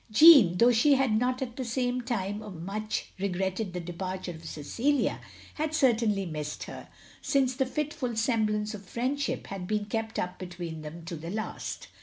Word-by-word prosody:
Jeanne, 220 - +8
though 240 +4 +6
she 260 +5 +5
had 265 -3 +2
not 250 +4 +1
at 240 -2 -7
the 250 0 -1
time 205 -6 -3
much 215 +2 -3
regretted 190 +1 -1
the 180 - -4
departure 185 +2 -4
of 160 -1 -11
Cecilia, 235 - 0 0.3
had 310 0 -2
certainly 225 -8 +3
missed 150 -3 -4
her, - - -9 0.3
since 265 -2 +1
a 265 - +3
fitful 290 -3 -2
semblance 215 -2 +1
of 205 -1 -8
friendship 255 +8 -2
had 190 -2 -6
been 210 0 0
kept 220 +1 -3
up 180 0 -3
between 175 -3 -6
them 160 +2 -8
to 170 0 -5
the 165 +2 -7
last. 215 +3 -4
215 Hz, 165 wpm, -29 LUFS, 180-250 Hz, 0.3 s, Jeanne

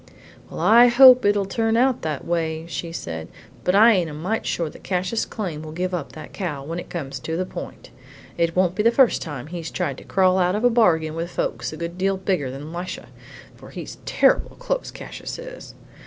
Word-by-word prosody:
"Well, - - -7
I 235 +2 +7
hope 255 0 +8
it'll 205 -1 +3
turn 225 +3 0
out 255 +1 +2
that 155 -3 -4
way," 165 -1 -2
she 170 0 -5
said. 80 - -6 0.4
"But 180 - +2
I 225 +3 +7
ain't 180 -5 0
a 150 - -8
mite 185 +9 -2
sure 170 - -1
that - - -11
Cassius 185 +4 -1
Came 175 -9 -5
will 155 -1 -8
give 180 +2 -2
up 170 -6 -4
that 155 - -10
cow 150 -8 -4
when 165 +4 -5
it - - -9
comes 135 -6 -5
to 160 +5 -4
the 185 - -1
point. - - -9 0.4
It 170 -1 0
won't 180 -1 +2
be 210 - -1
the 230 - +5
first 245 0 +3
time 145 -6 -6
he's 165 0 -6
tried 135 -2 -3
to - - -13
crawl 185 -1 +2
out 180 +1 +2
of 215 - -2
a 245 - +5
bargain 165 -9 +3
with 165 +1 -4
folks 120 -7 -3
a 155 - -8
good 170 +2 -6
deal 195 +1 +1
bigger 185 -8 -1
than 145 +5 -8
Lisha, 175 +1 -6 0.5
for - - -14
he's - - -8
terrible - - +2
close, - - -3
Cassius - - -8
is. - - -10
180 Hz, 215 wpm, -23 LUFS, 160-210 Hz, 0.5 s, hope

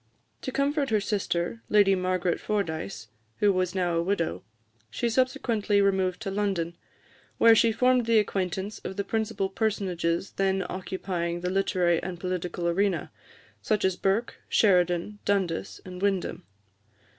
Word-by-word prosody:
To - - -4
comfort 280 0 0
her 215 -2 +3
sister, 200 0 -2
Lady 205 -2 +5
Margaret 185 -1 0
Fordyce, 160 - -3 0.3
who 205 -1 +3
was 185 0 -1
now 180 -2 +1
a - - +2
widow, 170 - -1 0.5
she 235 - -1
subsequently 225 -4 +1
removed 190 -1 +1
to 195 - -3
London, 190 -4 -1 0.6
where 230 0 +7
she 225 +1 +4
formed 250 +1 +2
the 230 -1 +4
acquaintance 195 0 -1
of 190 - -7
the 200 - 0
principal 215 -2 -1
personages 190 -4 -1
then 195 -1 +1
occupying 180 -2 -3
the 180 0 -1
literary 180 -3 +2
and 180 -2 -5
political 180 -1 -3
arena, 195 +3 0 0.5
such 215 -3 +1
as 190 -1 +2
Burke, 195 +6 0
Sheridan, 180 0 +2
Dundas, 190 -3 -1
and 180 0 -8
Windham. 195 - -1
190 Hz, 140 wpm, -27 LUFS, 180-210 Hz, 0.6 s, where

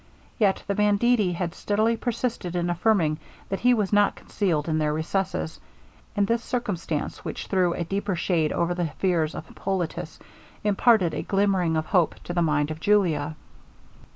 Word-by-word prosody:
Yet 200 -4 +2
the 200 - -1
banditti 210 0 +3
had 170 -1 -3
steadily 215 +3 +1
persisted 230 -6 -3
in 175 0 0
affirming 175 -4 +2 0.3
that 195 - -2
he 250 - +4
was 210 -3 -1
not 205 0 +4
concealed 170 -7 -1
in 155 -1 +1
their 150 -1 +1
recesses; 160 +1 -2 0.6
and 205 -1 +3
this 230 +3 0
circumstance, 190 -11 -3
which - - -5
threw 180 -3 +1
a 170 - -2
deeper 195 +3 -2
shade 170 -3 +1
over 170 +1 0
the 175 -1 -1
fears 170 -4 +1
of - - -6
Hippolitus, 190 -4 -4 0.5
imparted 205 -4 +3
a - - -2
glimmering 195 -5 +1
of 155 - -1
hope 175 -3 +2
to 175 - -5
the 175 - +1
mind 150 -2 +1
of 155 - -6
Julia. 160 -7 +2
185 Hz, 165 wpm, -25 LUFS, 165-205 Hz, 0.6 s, he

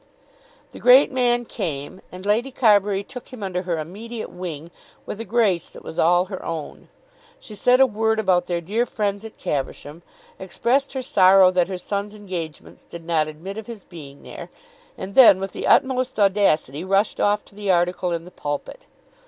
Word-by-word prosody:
The - - -11
great 255 +4 +6
man 240 -2 +1
came, 165 -6 -5
and 185 +1 -9
Lady 225 +6 +1
Carbury 205 -5 +2
took 250 +3 -10
him 245 -5 -8
under 180 -2 -2
her 175 -3 -2
immediate 215 +9 -7
wing 170 -3 -7 0.3
with 210 - -6
a - - -6
grace 200 -5 +1
that - - -14
was - - -7
all 175 +2 +4
her 190 0 -8
own. 165 -2 -7 0.5
She 220 - -11
said 250 +5 +3
a 265 - +7
word 220 -1 0
about 185 -4 +1
their 175 -1 -2
dear 220 +8 -1
friends 205 -1 -2
at 225 - -11
Caversham, 145 +3 -4 0.4
expressed 240 +10 -1
her 265 -1 -3
sorrow 190 -3 +5
that 180 -1 +1
her 185 -1 -4
son's 200 +3 -4
engagements 180 -7 -7
did 170 -1 -11
not 160 -2 +1
admit 175 +7 -7
of 220 - -10
his 225 -5 -9
being 145 -5 -12
there, - - -9 0.5
and 190 +1 -7
then 225 -7 +8
with 195 0 -4
the - - -4
utmost 255 -2 +2
audacity 190 -7 +2
rushed 195 +2 +1
off 205 0 +1
to - - -18
the 205 0 -5
article 180 0 0
in 170 0 -3
the 180 - -13
"Pulpit." 145 - -6
195 Hz, 185 wpm, -22 LUFS, 175-220 Hz, 0.5 s, then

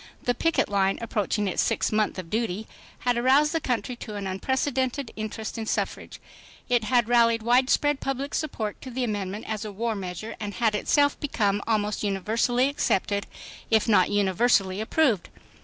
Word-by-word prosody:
The 245 - +1
picket 330 +6 +1
line, 195 -1 +1
approaching 210 -2 -1
its 185 - +1
sixth - - 0
month 215 -1 +1
of 180 -3 -7
duty, 220 -2 -1 0.4
had 245 -1 +1
aroused 275 +5 +4
the 325 - 0
country 245 -1 -2
to 215 -3 -7
an 200 -1 -4
unprecedented 260 +6 -1
interest 215 +1 -5
in 220 - -4
suffrage; - - -3 0.5
it 245 -3 +2
had 240 -1 +2
rallied 230 -2 +3
widespread 260 +4 +3
public 270 +1 -3
support 225 -9 -3
to 260 - -8
the 255 +1 -3
amendment 205 -2 -3
as 215 -1 -3
a 215 - -5
war 225 +3 -2
measure, 195 +3 -6
and 205 -2 -5
had 225 -3 +2
itself 285 +7 +2
become 205 -8 0
almost 210 -2 0
univer 205 +2 -2
sally 245 +2 +3
accepted 200 -7 0 0.4
if 220 0 +3
not 205 -5 +4
universally 200 0 +2
approved. 225 - +1
225 Hz, 170 wpm, -26 LUFS, 205-250 Hz, 0.5 s, aroused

